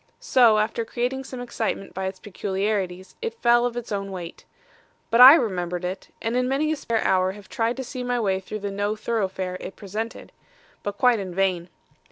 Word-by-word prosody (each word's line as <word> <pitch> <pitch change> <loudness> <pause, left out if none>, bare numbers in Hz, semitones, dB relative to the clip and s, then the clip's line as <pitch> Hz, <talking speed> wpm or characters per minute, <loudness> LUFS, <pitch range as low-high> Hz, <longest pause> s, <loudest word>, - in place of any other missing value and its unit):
So 250 - +5
after 220 +2 0
creating 250 +3 -2
some 255 -1 -7
excitement 225 -5 -3
by 190 +1 -3
its 190 0 -5
peculiarities, 195 -2 -3
it 460 0 -4
fell 240 0 +4
of 240 0 -6
its 240 -2 -6
own 195 -1 -2
weight. 175 -3 -8 0.7
But 230 - +5
I 265 +4 +12
remembered 180 - -1
it, 185 +2 -5 0.2
and 225 +1 -1
in 250 0 +1
many 295 +3 +1
a - - +1
spare 230 -6 -1
hour 185 0 +2
have 200 -1 -13
tried 230 +2 -1
to 265 - -3
see 255 0 -6
my 245 0 0
way 195 -4 +1
through 210 +2 -7
the 200 0 -3
no 205 +2 -1
thoroughfare 190 -4 -2
it 195 - -8
presented. 215 +3 -6 0.5
But 205 0 -4
quite 245 -3 +4
in 185 -3 -6
vain. 185 -2 0
215 Hz, 200 wpm, -24 LUFS, 190-245 Hz, 0.7 s, I